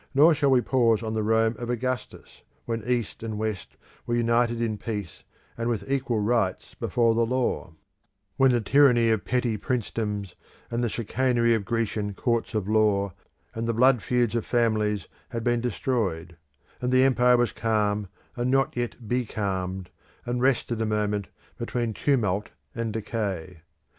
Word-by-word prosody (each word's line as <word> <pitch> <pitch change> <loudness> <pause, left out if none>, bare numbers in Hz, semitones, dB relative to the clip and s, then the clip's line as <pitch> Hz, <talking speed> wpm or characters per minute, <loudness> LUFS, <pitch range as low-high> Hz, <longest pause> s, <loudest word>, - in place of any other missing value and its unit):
Nor 155 +4 +7
shall 145 -2 +2
we 130 -2 +5
pause 115 -4 +2
on 110 0 -3
the 110 - 0
Rome 110 +1 +2
of 120 -1 -5
Augustus, 125 0 -4 0.2
when 115 -2 -3
East 120 -3 -1
and 110 -2 -4
West 110 -3 -4 0.3
were 120 - +1
united 120 0 +2
in 110 -3 -1
peace 105 -6 -5 0.3
and 115 +1 -2
with 105 -4 -2
equal 130 -4 0
rights 105 -4 0
before 115 -2 +1
the 115 +1 +2
law; 115 -8 -1 0.6
when 135 -1 +5
the 120 -2 +2
tyranny 120 -1 +5
of 110 -2 +1
petty 120 -3 0
princedoms, 105 -4 -3 0.4
and 120 +1 -1
the 120 - +1
chicanery 120 +1 +1
of 110 -3 -1
Grecian 105 -3 -1
courts 115 0 -1
of 105 -3 -1
law, 105 -3 +2 0.4
and 115 0 -3
the 115 - 0
blood 125 0 +4
feuds 120 -3 +1
of 115 -2 0
families 110 -5 +1 0.2
had 115 -1 -4
been 120 -1 +1
destroyed; 100 -8 -2 0.5
and 125 0 0
the 130 0 +5
empire 125 -2 +4
was 120 -1 +1
calm 105 -2 0 0.3
and 120 +1 -1
not 135 0 +2
yet 120 -1 -4
becalmed, 95 -6 -2 0.3
and 120 0 -2
rested 120 -3 +1
a - - +1
moment 105 -2 -1 0.3
between 120 -1 -2
tumult 105 -7 0 0.2
and 115 -3 -3
decay. 100 -6 -4
115 Hz, 160 wpm, -26 LUFS, 105-120 Hz, 0.6 s, Nor